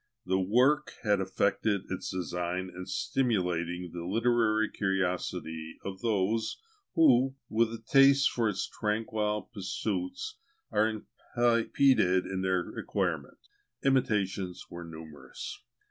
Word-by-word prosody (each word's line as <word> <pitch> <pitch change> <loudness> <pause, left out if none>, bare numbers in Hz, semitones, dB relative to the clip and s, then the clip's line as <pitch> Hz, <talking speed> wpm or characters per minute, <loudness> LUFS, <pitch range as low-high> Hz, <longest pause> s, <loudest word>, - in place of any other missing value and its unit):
The 95 +1 +1
work 125 +10 +3
had 105 -3 +3
effected 100 +1 +1
its 95 - -3
design 90 0 -3
in 90 +1 -7
stimulating 90 -8 -1
the 85 -1 -5
literary 110 +2 +2
curiosity 90 -5 -2
of 95 -1 -5
those, 110 0 0 0.4
who, 135 -4 +5
with 115 +1 +2
a 115 - -4
taste 135 +4 +5
for 115 -3 +1
its 100 -2 -2
tranquil 105 -1 -1
pursuits, 275 - -3 0.3
are 110 +1 +3 0.5
impeded 115 -5 +3
in 95 0 -3
their 95 -2 0
acquirement. - - -2 0.5
Imitations 100 -9 +1
were 85 0 -7
numerous. 80 -3 -9
105 Hz, 110 wpm, -30 LUFS, 90-115 Hz, 0.5 s, who